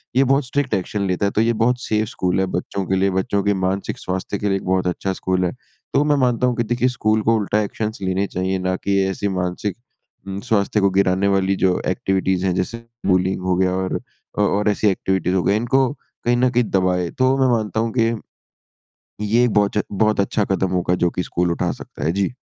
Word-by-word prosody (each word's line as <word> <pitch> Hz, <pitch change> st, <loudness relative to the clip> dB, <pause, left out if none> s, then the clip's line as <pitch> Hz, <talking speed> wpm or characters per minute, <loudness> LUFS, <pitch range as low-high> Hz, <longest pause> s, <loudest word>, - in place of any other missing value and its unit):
ये 135 Hz, -, +5 dB
बहुत 135 Hz, +1 st, +2 dB
strict 135 Hz, -1 st, -1 dB
action 100 Hz, +1 st, -1 dB
लेता 90 Hz, +2 st, 0 dB
है। 100 Hz, -, +1 dB
तो 110 Hz, -, +1 dB
ये 115 Hz, +1 st, +2 dB
बहुत 125 Hz, +1 st, +1 dB
सेफ 110 Hz, 0 st, 0 dB
स्कूल 90 Hz, -4 st, -1 dB
है 95 Hz, -, +2 dB
बच्चों 100 Hz, -1 st, -3 dB
के 95 Hz, -, 0 dB
लिए, 95 Hz, +1 st, +2 dB
बच्चों 95 Hz, +1 st, 0 dB
के 100 Hz, -, +2 dB
मानसिक 95 Hz, +1 st, -2 dB
स्वास्थ्य 95 Hz, +2 st, -3 dB
के 105 Hz, -, -1 dB
लिए 95 Hz, -1 st, +2 dB
एक -, -, -8 dB
बहुत 95 Hz, -1 st, +1 dB
अच्छा 95 Hz, +2 st, -1 dB
स्कूल 95 Hz, 0 st, 0 dB
है। 90 Hz, -, 0 dB, 0.4 s
तो 140 Hz, -, +4 dB
मैं 150 Hz, 0 st, +3 dB
मानता 125 Hz, 0 st, +2 dB
हूँ 125 Hz, -, 0 dB
कि 120 Hz, -, 0 dB
देखिए, 120 Hz, +2 st, +1 dB
स्कूल 110 Hz, -3 st, +1 dB
को 115 Hz, +1 st, +3 dB
उल्टा 105 Hz, 0 st, 0 dB
एक्शंस 105 Hz, +1 st, -3 dB
लेने 95 Hz, +1 st, 0 dB
चाहिए, 95 Hz, +1 st, -1 dB
ना 95 Hz, 0 st, 0 dB
कि 100 Hz, +1 st, 0 dB
ऐसी 95 Hz, +1 st, -2 dB
मानसिक 90 Hz, +2 st, -2 dB, 0.5 s
उम, 95 Hz, 0 st, -4 dB
स्वास्थ्य 105 Hz, -3 st, +1 dB
को 100 Hz, -, +4 dB
गिराने 95 Hz, 0 st, +2 dB
वाली 95 Hz, 0 st, +2 dB
जो 95 Hz, -1 st, +2 dB
एक्टिविटीज़ 95 Hz, 0 st, 0 dB
हैं 95 Hz, -, +1 dB
जैसे 95 Hz, +6 st, -2 dB, 0.3 s
बुलिंग 95 Hz, 0 st, +2 dB
हो 90 Hz, 0 st, +1 dB
गया 90 Hz, 0 st, +2 dB
और 95 Hz, 0 st, -1 dB, 0.4 s
अ -, -, +4 dB
और 105 Hz, +1 st, +2 dB
ऐसी 105 Hz, +1 st, +1 dB
एक्टिविटीज़ 95 Hz, -1 st, 0 dB
हो 90 Hz, -, +1 dB
गई। 100 Hz, -, +2 dB
इनको 125 Hz, +4 st, +2 dB, 0.4 s
कहीं 120 Hz, 0 st, +3 dB
न 125 Hz, +1 st, +3 dB
कहीं 125 Hz, 0 st, +2 dB
दबाएँ। 90 Hz, -2 st, +1 dB
तो 130 Hz, +1 st, +3 dB
मैं 130 Hz, -, +3 dB
मानता 110 Hz, 0 st, -2 dB
हूँ 115 Hz, 0 st, 0 dB
कि, 115 Hz, -1 st, +3 dB, 1.1 s
ये 120 Hz, +4 st, +3 dB
बहुच 105 Hz, -1 st, +1 dB
बहुत 105 Hz, +1 st, +1 dB
अच्छा 100 Hz, +2 st, +1 dB
कदम 95 Hz, -1 st, 0 dB
होगा, 90 Hz, -1 st, +1 dB
जो 90 Hz, 0 st, +1 dB
कि 90 Hz, -, -3 dB
स्कूल 90 Hz, 0 st, -1 dB
उठा 85 Hz, -, -1 dB
सकता -, -, -9 dB
है। 80 Hz, -, +2 dB
जी। 100 Hz, +4 st, 0 dB
100 Hz, 225 wpm, -21 LUFS, 95-110 Hz, 1.1 s, ये